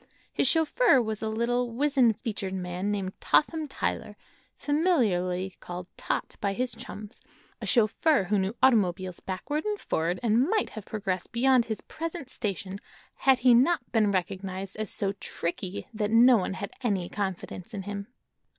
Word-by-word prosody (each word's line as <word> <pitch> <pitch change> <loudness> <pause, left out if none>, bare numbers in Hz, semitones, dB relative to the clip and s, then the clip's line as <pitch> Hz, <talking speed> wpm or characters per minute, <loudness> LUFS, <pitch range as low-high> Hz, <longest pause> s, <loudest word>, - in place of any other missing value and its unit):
His - - +2
chauffeur 325 - +4
was 220 -3 -2
a 220 - -1
little, 240 +2 0
wizen 265 -1 +3
featured 205 -4 -4
man 180 +1 -3
named 195 -2 -2
Totham 315 0 +2
Tyler, - - -3 0.4
familiarly 195 - +1
called 180 0 -7
"Tot" - - -3
by 200 -1 0
his 250 +4 -1
chums, 210 0 -9 0.4
a - - -4
chauffeur 240 +4 +3
who 200 +2 +1
knew 190 +4 -1
automobiles 185 -7 +3
backward 290 +11 -3
and 420 -1 -2
forward 170 +3 -1
and 235 +6 +3
might 435 0 +1
have 215 -2 -8
progressed 195 -4 -3
beyond 250 0 +4
his 220 -2 -4
present 325 -4 -6
station 195 -2 -4 0.3
had 265 -1 +3
he 250 - +8
not 295 +8 +3
been 215 -3 +3
recognized 190 0 -3
as 215 -3 -3
so 195 -1 -1
"tricky" 185 -1 -4
that 210 -1 -1
no 240 +3 +7
one 190 -1 -2
had 200 +1 -5
any 200 -8 0
confidence 190 0 -4
in 200 -4 -5
him. 200 0 -5
215 Hz, 160 wpm, -28 LUFS, 190-255 Hz, 0.4 s, he